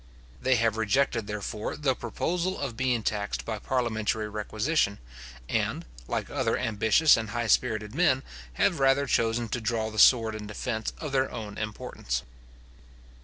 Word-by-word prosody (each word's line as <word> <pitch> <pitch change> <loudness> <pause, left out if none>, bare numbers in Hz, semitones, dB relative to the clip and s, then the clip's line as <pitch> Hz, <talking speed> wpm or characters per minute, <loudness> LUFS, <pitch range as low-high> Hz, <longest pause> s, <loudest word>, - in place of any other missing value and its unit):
They 130 0 +3
have 115 -2 +1
rejected, 115 0 +1
therefore, 105 0 -4
the 140 -3 +1
proposal 175 +10 -2
of 135 -5 -3
being 125 -2 0
taxed 105 -1 -2
by 110 -2 -3
parliamentary 110 -3 -1
requisition, 105 +2 0 0.5
and, - - -1 0.2
like - - -2
other - - 0
ambitious 110 +8 +4
and 110 -2 -3
high 120 +3 -2
spirited 110 -1 +1
men, 135 -5 +3 0.3
have 60 - +2
rather 135 +1 +4
chosen 115 -2 +1
to 120 - -2
draw 110 -1 -1
the 110 - -3
sword 115 -1 +6
in 105 -1 -6
defence 110 +1 -3
of 150 - -5
their 135 -1 +1
own 105 -3 -6
importance. 85 - -4
115 Hz, 150 wpm, -28 LUFS, 105-130 Hz, 0.5 s, sword